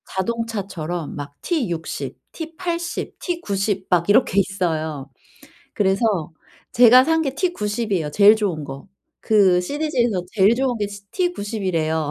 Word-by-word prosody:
자동차처럼 190 -6 -3
막 145 -1 -7
T60, 195 - -3 0.2
T80, 340 +1 -4
T90 200 - -2
막 175 0 +2
이렇게 205 -2 +4
있어요. 160 -7 -2 0.7
그래서 195 -4 +1 0.4
제가 245 +1 +7
산 320 +2 +2
게 275 -3 -2
T90 235 - -2
이에요, 160 -6 0
제일 205 +6 +6
좋은 190 -8 -2
거. 135 +4 -9 0.3
그 195 -5 +4
시디즈에서 240 - -1
제일 205 +1 +4
좋은 255 -1 0
게 205 - -1 0.3
T90이래요. 190 - -1
205 Hz, 235 characters per minute, -21 LUFS, 175-250 Hz, 0.7 s, 제가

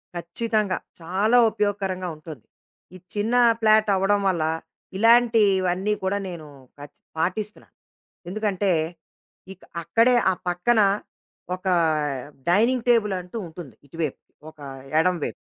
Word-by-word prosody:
ఖచ్చితంగా! 205 +3 -1 0.2
చాలా 195 +8 +2
ఉపయోగకరంగా 195 -3 -2
ఉంటుంది. 155 -7 -11 0.5
ఈ - - -8 0.2
చిన్న 215 +4 0 0.2
ఫ్లాటవ్వడం 205 -2 +3
వల్ల 170 -4 0 0.5
ఇలాంటివన్నీ 210 -4 +3
కూడా 190 +2 0
నేను 165 -4 -8 0.3
ఖచ్ 145 0 -11 0.2
పాటిస్తున్నాను. 200 +6 -3 0.5
ఎందుకంటే 200 -1 -1 0.8
ఇక్ 185 - -23 0.2
అక్కడే 235 +8 +3 0.2
ఆ - - 0 0.2
పక్కన 215 +6 +2 0.7
ఒకా 185 0 -1 0.8
డైనింగ్ 230 +6 +2
టేబులంటూ 205 -4 +1
ఉంటుంది 160 -4 -11
ఇటువైపు 155 -1 -4 0.3
ఒక 155 - -31 0.4
ఎడమ 180 +2 +2
వైపు. - - -4
195 Hz, 100 wpm, -24 LUFS, 175-215 Hz, 0.8 s, ఫ్లాటవ్వడం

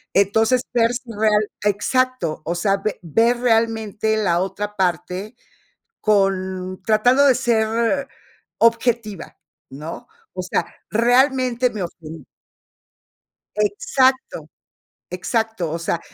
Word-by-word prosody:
Entonces, 220 +5 +3
sers 240 +2 +2
real 215 -2 +1 0.2
exacto, 210 -3 0
o 170 - -2
sea, 195 +3 +1
ve 200 +1 -3
ver 230 +9 +2
realmente 225 -2 +1
la 175 -5 +1
otra 205 +2 -4
parte, 185 +3 -2 0.7
con 190 -3 0
tratando 245 +6 +4
de 260 - +6
ser 235 +2 0 0.5
objetiva, 230 -2 0 0.3
¿no? 150 - -8 0.2
O 185 - -5
sea, 180 - -1 0.2
realmente 250 +1 +2
me 215 -4 -5
ofen 160 -3 -8 1.3
Exacto, 260 - 0 0.6
exacto. 190 -1 -2
O 165 - -3
sea, 170 0 -1
215 Hz, 100 wpm, -21 LUFS, 190-240 Hz, 1.3 s, de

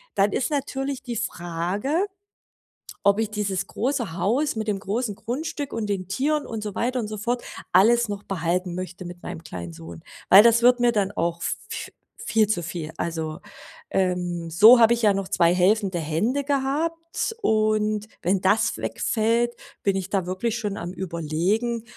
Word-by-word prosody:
Dann 200 +1 +3
ist 245 - 0
natürlich 275 -2 -3
die 240 -2 -4
Frage, 185 - -2 1.0
ob 200 +1 +4
ich 220 -2 0
dieses 200 -3 -2
große 240 - -2
Haus 245 - +1
mit 220 0 -3
dem 205 -2 0
großen 210 +3 -2
Grundstück 285 +5 -4
und 225 -2 -2
den 195 -3 -2
Tieren 290 +8 0
und 225 -1 -5
so 210 -2 -4
weiter 250 +2 0
und 220 - -3
so 215 0 -5
fort 240 +4 -1 0.3
alles 230 +5 +5
noch 205 0 -4
behalten 180 0 -1
möchte 185 0 -6
mit 175 0 -9
meinem 160 - -7
kleinen 85 - -7
Sohn, 80 0 -10 0.3
weil 195 - +10
das 235 0 +5
wird 245 0 +6
mir 240 0 +4
dann 200 -3 0
auch 170 -3 -1
v - - 0
v - - -6 0.4
viel 220 -1 +3
zu 180 -5 -1
viel. 165 -1 -5
Also, 160 -1 -3 0.5
ähm, 180 -2 -1
so 215 +9 +8
habe 235 0 +6
ich 235 - -5
ja 210 -2 +5
noch 195 -1 -2
2 175 -3 +3
helfende 190 0 +2
Hände 175 - 0
gehabt. 320 +8 -1
Und 215 - +1 0.2
wenn 185 +2 +1
das 195 +4 +2
wegfällt, 235 +2 0 0.3
bin 195 -1 +2
ich 190 -1 -3
da 195 -3 0
wirklich 200 +6 -2
schon 210 -3 -3
am 175 - -5
Überlegen, 190 +7 -1
205 Hz, 175 wpm, -24 LUFS, 180-235 Hz, 1.0 s, weil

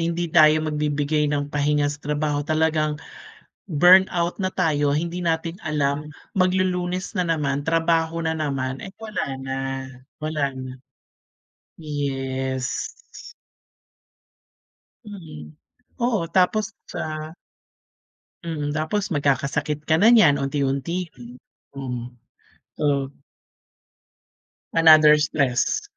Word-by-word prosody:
hindi 170 0 -2
tayo 155 -1 +6
magbibigay 150 0 0
ng 145 0 -2
pahinga 145 0 +1
sa 145 - -11
trabaho 150 0 -1
talagang, 155 0 0 0.7
burnout 175 +1 +4
na 185 - +1
tayo 145 -5 +1
hindi 170 +4 -2
natin 165 +1 -1
alam 150 -1 -1 0.3
maglulunes 185 0 0
na 180 - +1
naman 145 -3 0
trabaho 165 0 +1
na 160 - +1
naman, 135 -4 -2
eh, - - -7
wala 220 -1 -4 0.2
na, 135 0 -3 0.7
wala 150 -3 -1
na. 130 0 -6 1.1
Yes. 135 -3 -3 2.2
Mm, 165 - -10 0.5
oo 235 -5 +1
tapos 190 +3 +3 0.2
sa 155 +1 -5 1.1
Mm, 150 -3 -3
tapos 175 +7 -1
magkakasakit 145 +2 -1
ka 160 - +3
na 225 - +7
niyan 185 -12 +6
unti-unti 140 +5 -1
rin. 120 0 -12 0.4
Mm, 125 -2 -5 0.7
oo. 140 -2 +1 1.7
Another 155 -2 +7
stress. 140 -4 0
155 Hz, 95 wpm, -23 LUFS, 140-170 Hz, 2.2 s, na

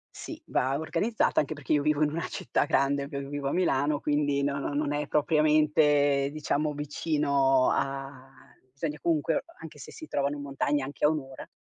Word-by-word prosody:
Sì, - - -8
va 135 +2 0
organizzata 180 +8 0
anche 150 - -1
perché 145 -1 -3
io 145 - +3
vivo 150 0 +1
in 150 - +2
una 165 +2 -3
città 120 - -1
grande, 140 +1 +1
ve 140 -1 -5
vivo 140 0 -4
a - - -2
Milano, 145 -4 +1
quindi 145 -1 0
no 140 0 0 0.2
non 145 0 -1
è 145 0 -2
propriamente, 150 -2 +3
diciamo, 150 0 -1
vicino 140 -3 +1
a 135 -1 -3 0.5
sogna 150 +2 -4
comunque 165 -1 +1 0.2
anche - - -10
se - - -10
si 315 - -10
trovano 140 - -1
montagne 140 0 -1
anche 140 +2 -2
a - - +6
1 155 0 0
ora. 135 -2 -11
145 Hz, 175 wpm, -28 LUFS, 140-150 Hz, 0.5 s, a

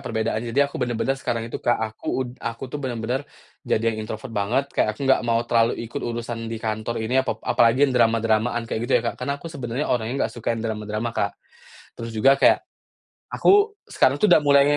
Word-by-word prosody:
perbedaannya 110 +1 -2
jadi 140 +2 +4
aku 140 - -15
bener-bener 125 +1 0
sekarang 115 -3 -3
itu - - -6
Kak 120 - +3
aku 110 0 -5 0.2
ud - - -7
aku 115 +2 -4
tuh 145 - -4
bener-bener, 125 0 -2 0.4
jadi 115 +1 0
yang 110 0 -5
introvert 115 +2 -6
banget 110 +7 0
kayak 110 0 +1
aku 140 - -4
nggak 135 - +4
mau 115 -1 +1
terlalu 115 -1 +2
ikut 115 - -5
urusan 115 -1 -4
di 115 - -4
kantor 110 +1 -3
ini 130 +4 +2
apa 120 - -2
apalagi 120 +4 +4
drama-dramaan 115 0 +2
kayak 110 - -3
gitu - - 0
ya - - -5
Kak - - -16
karena 140 +2 -1
aku 145 - -11
sebenarnya 130 0 -3
orangnya 120 +3 0
nggak - - -3
suka 115 0 -2
drama-drama 110 0 -3
Kak. 100 - -1 0.6
Terus 115 0 -6
juga 135 +5 +4
kayak, - - +5 0.7
aku 410 +1 +4 0.2
sekarang 135 +1 +3
tuh 210 - +5
udah 175 - +7
mulai 140 -1 +6
115 Hz, 200 wpm, -23 LUFS, 110-130 Hz, 0.7 s, udah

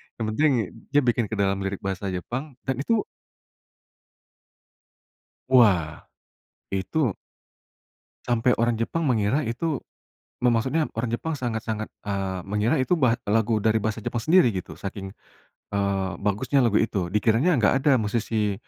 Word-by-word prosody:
Yang 115 - -3
penting 150 +7 +3 0.4
dia 145 - +7
bikin 120 -1 +1
ke 110 - -4
dalam 100 -1 +1
lirik 95 0 -3
bahasa 95 0 -3
Jepang 130 - -5 0.2
dan 130 - 0
itu 215 +10 +1 2.5
wah, 100 -12 +4 0.7
itu 100 - 0 1.1
sampai 120 +1 +2
orang 115 0 +1
Jepang 165 +8 -1
mengira 125 +2 +1
itu 130 +5 -2 0.6
me 125 - +5
maksudnya 130 +7 +1
orang 115 +2 0
Jepang 160 +7 -2
sangat-sangat, 110 -3 -3 0.2
eee, 95 -2 -2
mengira 105 +4 0
itu 150 +6 +1
ba 125 -4 +4
lagu 110 0 +2
dari 110 0 +3
bahasa 110 +1 -3
Jepang 120 - -2
sendiri, 160 +1 +4
gitu, 95 -3 -6
saking, 95 0 -7 0.6
eee, 100 -1 0
bagusnya 130 +7 +1
lagu 115 -3 +3
itu, 95 -6 -1
dikiranya 115 - +2
nggak 105 - +4
ada 145 0 +4
musisi 110 -1 -1
115 Hz, 135 wpm, -25 LUFS, 100-130 Hz, 2.5 s, dia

